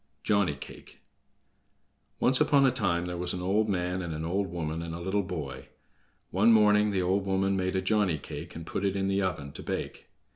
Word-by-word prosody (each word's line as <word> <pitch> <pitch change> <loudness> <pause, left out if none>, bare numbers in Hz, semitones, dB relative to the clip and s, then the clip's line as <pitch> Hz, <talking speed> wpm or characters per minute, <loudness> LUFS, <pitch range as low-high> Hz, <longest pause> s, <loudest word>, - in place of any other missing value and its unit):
Johnny 100 -8 +2
Cake 70 - -12 1.2
Once 130 +1 +4
upon 140 -2 +5
a 130 - +5
time 90 -8 0
there 90 -1 -4
was 90 0 -2
an 90 - -4
old 105 +4 +1
man, 90 -1 -1
and 85 -3 -4
an 80 +1 -4
old 95 +4 0
woman, 80 -2 -4
and 85 0 -5
a - - -6
little 95 +4 0
boy. 75 -9 -6 0.6
One 105 +5 +4
morning 105 -1 +5
the 95 -3 0
old 95 +2 +1
woman 95 0 +1
made 95 0 -1
a 95 - 0
Johnny 100 -5 +2
cake, - - -8
and 80 0 -7
put 95 - -3
it 100 -1 +1
in 95 0 0
the 100 0 +1
oven 80 -7 -2
to - - -9
bake. - - -5
95 Hz, 210 wpm, -28 LUFS, 85-100 Hz, 1.2 s, upon